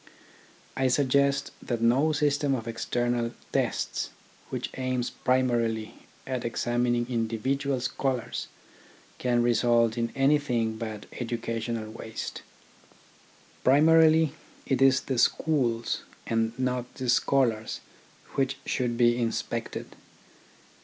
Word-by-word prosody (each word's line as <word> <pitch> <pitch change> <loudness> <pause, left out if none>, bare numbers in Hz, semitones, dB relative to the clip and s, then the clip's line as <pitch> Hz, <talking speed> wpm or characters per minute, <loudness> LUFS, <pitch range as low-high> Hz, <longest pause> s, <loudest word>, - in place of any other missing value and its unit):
I 130 0 +2
suggest 140 +1 +2
that 120 -2 -2
no 125 +7 +3
system 145 -2 +1
of 115 -2 -5
external 120 +1 -1 0.2
tests - - -1 0.4
which - - -4
aims 130 -1 -1
primarily 120 -4 0 0.3
at 130 -2 -3
examining 120 +1 0
individual 130 +4 -1
scholars 130 -1 -2 0.7
can 120 -1 +2
result 120 -1 +3
in 115 0 -1
anything 135 -5 +2
but 110 -2 -5
educational 115 -2 -3
waste. 110 0 -6 1.2
Primarily 160 +2 +5 0.3
it 135 -2 0
is 135 0 +5
the 130 -3 -2
schools 120 -6 +1 0.2
and 115 0 0
not 125 -1 -1
the 130 - -4
scholars 120 -3 +2 0.5
which 135 0 0
should 120 -2 -1
be 120 0 +4
inspected. 115 -1 -3
120 Hz, 100 wpm, -27 LUFS, 115-135 Hz, 1.2 s, Primarily